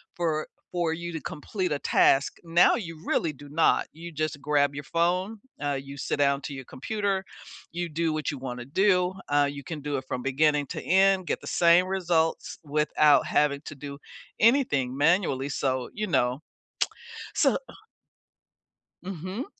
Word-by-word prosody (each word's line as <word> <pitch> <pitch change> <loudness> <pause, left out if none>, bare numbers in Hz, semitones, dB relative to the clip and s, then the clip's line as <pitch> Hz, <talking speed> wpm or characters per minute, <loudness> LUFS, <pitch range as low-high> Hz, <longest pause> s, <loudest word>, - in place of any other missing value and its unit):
for 160 -3 -1 0.2
for 175 -2 0
you 170 +1 -5
to 160 - -4
complete 180 +3 -4
a 145 - 0
task, 135 -1 +3
now 170 +1 +5
you 165 -8 -6
really 160 - +1
do 145 +1 -13
not. 160 +3 +2
You 170 +2 -9
just 155 -2 -3
grab 145 -1 +2
your 145 - -5
phone, 180 +8 0 0.2
uh, 145 0 0
you 140 +1 -10
sit - - -2
down 140 -1 +3
to 145 - -5
your 135 -1 -8
computer, 195 - -2 0.5
you 175 0 -3
do 165 +1 0
what 155 -3 -2
you 140 - -6
wanna 125 -2 -6
do. 180 +4 +2 0.2
Uh, 145 0 +3
you 140 0 -8
can 155 +3 -6
do 145 0 -3
it 130 - -5
from 125 - -3
beginning 145 +3 +2
to - - -5
end, 190 -1 +3
get - - -1
the - - -10
same 170 +1 +5
results 170 -4 0
without 150 0 +3
having 145 -1 +1
to - - -7
do 140 0 -8 0.4
anything 150 - +3
manually, 145 -3 +2
so, 130 -3 -1
you 215 +1 -3
know. 130 -4 +1 0.9
So, - - +3
oh - - -11 1.3
Mhm. 185 - -5
155 Hz, 170 wpm, -27 LUFS, 140-175 Hz, 1.3 s, now